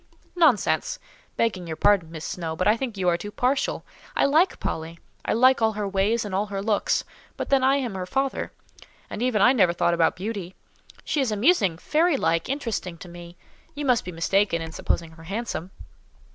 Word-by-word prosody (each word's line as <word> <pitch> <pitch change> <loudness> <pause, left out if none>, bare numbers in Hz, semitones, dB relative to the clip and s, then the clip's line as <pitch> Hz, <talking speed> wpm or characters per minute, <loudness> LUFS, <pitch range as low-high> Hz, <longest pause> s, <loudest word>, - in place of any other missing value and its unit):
"Nonsense!—begging 230 - 0
your 160 - -4
pardon, 190 -1 +3
Miss 160 -1 -7
Snowe, 165 -3 -4
but 185 - 0
I 210 - +5
think 235 -3 -4
you 185 -1 -1
are 170 -1 +3
too 205 - -6
partial. 255 +6 -1 0.3
I - - +3
like 315 +7 +3
Polly: 160 +1 -4 0.3
I - - +1
like 255 +3 +4
all 220 -1 +3
her 210 -1 -3
ways 200 +4 +1
and 205 - -6
all 200 +3 0
her 200 -1 -4
looks—but 205 +1 -2
then 275 -1 +3
I 270 +1 +4
am 255 -6 -2
her 185 -1 -5
father; 270 +6 -1 0.6
and - - -5
even 240 -5 +2
I 250 - +6
never 185 -9 +3
thought 175 0 +1
about 170 -1 +2
beauty. 190 -2 -5 0.5
She 295 - 0
is 255 -5 0
amusing, 210 - +2
fairy 310 - +2
like, 165 -3 0
interesting 230 -10 -3
to 175 - -11
me;—you 175 - -11
must 250 -3 +3
be 180 - -6
mistaken 175 +2 +1
in 165 0 -6
supposing 165 0 -2
her 165 0 -14
handsome?" 195 -2 -4
205 Hz, 185 wpm, -25 LUFS, 175-255 Hz, 0.6 s, I